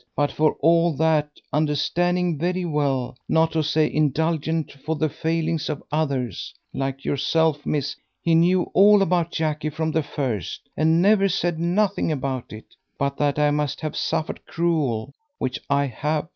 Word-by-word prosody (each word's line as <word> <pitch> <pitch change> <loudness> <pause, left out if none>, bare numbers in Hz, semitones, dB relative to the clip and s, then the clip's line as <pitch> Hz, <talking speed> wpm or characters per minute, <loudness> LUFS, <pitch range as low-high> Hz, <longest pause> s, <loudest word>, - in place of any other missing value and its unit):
But 145 0 +1
for 155 0 +2
all 170 +2 +4
that, 155 0 +2 0.2
understanding 170 +3 +1
very 180 +2 -1
well, 140 -6 -1
not 160 0 +3
to 160 - +1
say 155 0 +2
indulgent 160 +1 0
for 145 +3 -4
the 155 0 0
failings 165 +1 -1
of 150 -2 -4
others, 140 -5 -2 0.2
like 135 0 -3
yourself, 150 +2 +1
miss. 145 -2 -1 0.2
He 165 - +1
knew 175 +2 +4
all 205 +1 +6
about 175 -2 +1
Jackie 155 -1 -1
from 160 +1 -2
the 160 - +1
first, 135 - -3
and 160 +3 +3
never 195 -1 +4
said 175 -3 -1
nothing 185 +2 +1
about 135 -4 -3
it, 110 0 -11 0.2
but 140 0 -1
that 145 -1 +1
I 150 0 +3
must 150 -1 -1
have 155 -1 -4
suffered 160 - -2
cruel, 140 -8 -1 0.2
which 130 - -2
I 140 0 +2
have. 150 +5 -2
155 Hz, 160 wpm, -23 LUFS, 145-165 Hz, 0.2 s, all